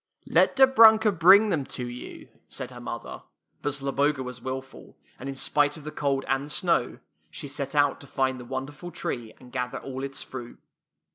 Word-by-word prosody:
" - - -57
Let - - +3
Dobrunka 225 -5 +7
bring 195 +4 +6
them 160 -7 0
to 125 - -3
you," 120 0 -9 0.2
said - - -6
her - - -10
mother; - - -6 0.4
but 145 - -1
Zloboga 140 0 0
was 125 -1 -8
wilful, 130 +1 -7 0.2
and 135 - -6
in 135 - -5
spite 145 +3 +1
of 155 - -12
the 155 - -6
cold 140 -2 -1
and 135 +1 0
the - - -11
snow, 155 -4 0 0.3
she 80 - -7
set 140 0 -5
out 145 -1 +2
to 140 - -12
find 130 -1 -1
the 125 - -9
wonderful 135 +6 -6
tree 120 -8 -5
and 125 - -15
gather 125 -1 -3
all 130 0 -6
its 135 0 -4
fruit. 120 -2 -9
135 Hz, 195 wpm, -26 LUFS, 130-150 Hz, 0.4 s, Dobrunka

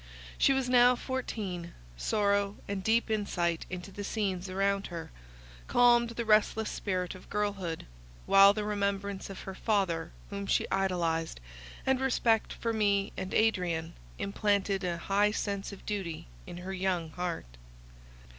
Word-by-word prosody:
She - - +5
was 265 -2 +1
now 250 0 +6
fourteen; 210 -10 -4 0.2
sorrow, 200 - +1
and 200 -1 -3
deep 225 +1 +2
insight 175 -6 0
into 185 +1 -6
the 205 - -6
scenes 195 -3 -2
around 195 +1 0
her, 170 -2 -7 0.6
calmed 240 -1 +5
the 235 0 -4
restless 215 0 +3
spirit 185 -3 -2
of 185 - -13
girlhood; 200 -5 -2 0.4
while 195 0 +8
the 210 +1 -2
remembrance 200 -1 -2
of 195 - -7
her 190 - -6
father 185 -6 0 0.2
whom 200 0 -4
she - - +2
idolized, 170 - 0 0.5
and 265 0 +2
respect 235 -4 +2
for 230 -1 -2
me 205 -2 +1
and 190 0 -4
Adrian, 180 -7 +1 0.2
implanted 200 -1 0
an 175 -2 -1
high 200 +4 +2
sense 200 -2 -3
of 200 - -11
duty 190 -6 -3 0.2
in 175 - -7
her 185 +2 -5
young 180 -4 -1
heart. 165 - -5
200 Hz, 145 wpm, -30 LUFS, 180-215 Hz, 0.6 s, while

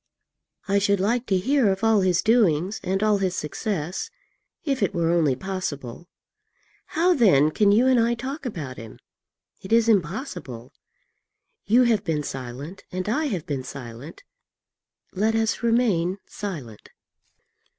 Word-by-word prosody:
I 200 0 +3
should 200 -1 +2
like 230 +6 0
to 190 - +2
hear 245 +1 +2
of 190 +2 -3
all 225 -2 +4
his 185 -1 +2
doings 205 -4 +2
and 195 +3 -1
all 210 -2 +3
his 185 -2 -1
success, 180 - -3 0.6
if 275 -4 -1
it - - 0
were 165 -1 +1
only 160 -6 +2
possible. 175 -4 -5 0.9
How, 355 +2 +4
then, 175 - +4
can 205 +4 +3
you 225 +5 +4
and 260 -2 +4
I 235 +1 +2
talk 265 +5 -6
about 155 - -5
him? 115 -1 -10 0.6
It 190 - -10
is 230 0 +4
impossible. 175 - -2 0.9
You 240 +5 +5
have 225 -4 +2
been 155 -5 -1
silent 135 +7 -7
and 185 +1 -4
I 295 +9 0
have 190 - -3
been 140 -5 -3
silent, 130 - -9 0.9
let 215 +4 +1
us 225 0 0
remain 220 -7 +1
silent." 145 - -7
195 Hz, 145 wpm, -24 LUFS, 155-225 Hz, 0.9 s, You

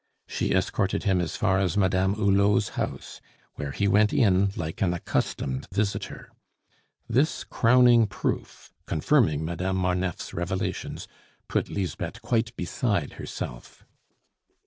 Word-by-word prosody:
She - - -2
escorted - - 0
him 95 -2 +2
as 85 -1 -3
far 95 -4 +2
as 95 -1 0
Madame 95 0 +2
Hulot's 100 0 +3
house, - - -5 0.3
where 70 - -5
he 100 +8 0
went 105 +2 +4
in 100 -4 +3
like 80 +7 -5
an 90 -3 +2
accustomed 65 -5 -2
visitor. 100 +1 -3 0.8
This 130 +7 +1
crowning 120 -1 +5
proof, 95 - -4
confirming 80 - +2
Madame 90 +3 -2
Marneffe's 90 -1 -1
revelations, 95 +3 -3 0.4
put - - -1
Lisbeth 95 -5 -4
quite 115 0 0
beside 90 - -1
herself. - - -7
95 Hz, 120 wpm, -26 LUFS, 90-105 Hz, 0.8 s, crowning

